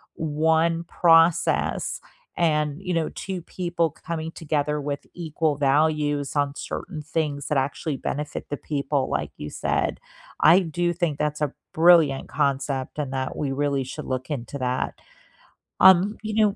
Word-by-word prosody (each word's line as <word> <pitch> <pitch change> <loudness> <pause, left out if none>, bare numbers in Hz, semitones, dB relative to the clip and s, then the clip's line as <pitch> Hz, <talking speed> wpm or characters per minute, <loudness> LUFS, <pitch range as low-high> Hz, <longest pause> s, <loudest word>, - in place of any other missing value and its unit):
1 160 +2 +1
process 165 -1 +3 0.4
and, 150 -1 +1
you 180 -2 -3
know, 165 -1 0
2 185 -2 -5
people 170 -4 -1
c - - -23
coming 165 -1 -3
together 150 -2 -1
with 145 0 -4
equal 160 -3 -1
values 145 0 +1
on 145 0 0
certain 160 -5 -6
things 150 -3 -2
that 150 - 0
actually 140 +1 -2
benefit 150 +3 -4
the 145 - -3
people, 140 -2 -1
like - - -2
you 75 - -6
said. - - -1 0.4
I 170 +4 +7
do 175 +1 -1
think 170 -5 -1
that's 150 0 -1
a 145 -2 0 0.2
brilliant 160 -5 +5
concept 135 0 -1
and 140 -3 -3
that 130 0 -3
we 140 -2 -1
really 140 -1 0
should 130 - -7
look 130 +3 -4
into 140 +1 -4
that. 125 0 -1 0.9
Um, 190 +3 +6
you 215 0 -3
know 210 -2 +3
150 Hz, 150 wpm, -24 LUFS, 140-165 Hz, 0.9 s, I